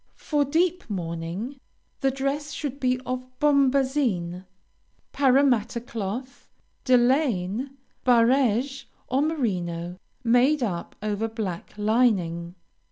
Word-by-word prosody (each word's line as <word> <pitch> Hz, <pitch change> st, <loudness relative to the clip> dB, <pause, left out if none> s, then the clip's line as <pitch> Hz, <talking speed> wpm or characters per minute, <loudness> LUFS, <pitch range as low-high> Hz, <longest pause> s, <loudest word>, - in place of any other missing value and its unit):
For 295 Hz, -2 st, +1 dB
deep 335 Hz, +3 st, 0 dB
mourning, 175 Hz, +7 st, -4 dB, 0.4 s
the 270 Hz, -, +2 dB
dress 275 Hz, +3 st, -2 dB
should 280 Hz, -2 st, -4 dB
be 255 Hz, -2 st, +1 dB
of 255 Hz, 0 st, -3 dB, 0.2 s
bombazine, 265 Hz, -11 st, +2 dB, 0.7 s
Parramatta 255 Hz, -4 st, +3 dB
cloth, 235 Hz, +2 st, -6 dB, 0.3 s
delaine, 250 Hz, -, +2 dB, 0.3 s
barege, 250 Hz, +2 st, +3 dB, 0.2 s
or 260 Hz, +2 st, +2 dB
merino, 180 Hz, -, -2 dB, 0.3 s
made 250 Hz, +4 st, +4 dB
up 175 Hz, -7 st, -3 dB
over 215 Hz, +1 st, -1 dB
black 215 Hz, -6 st, -5 dB
lining. 195 Hz, -6 st, +1 dB
245 Hz, 95 wpm, -25 LUFS, 200-275 Hz, 0.7 s, made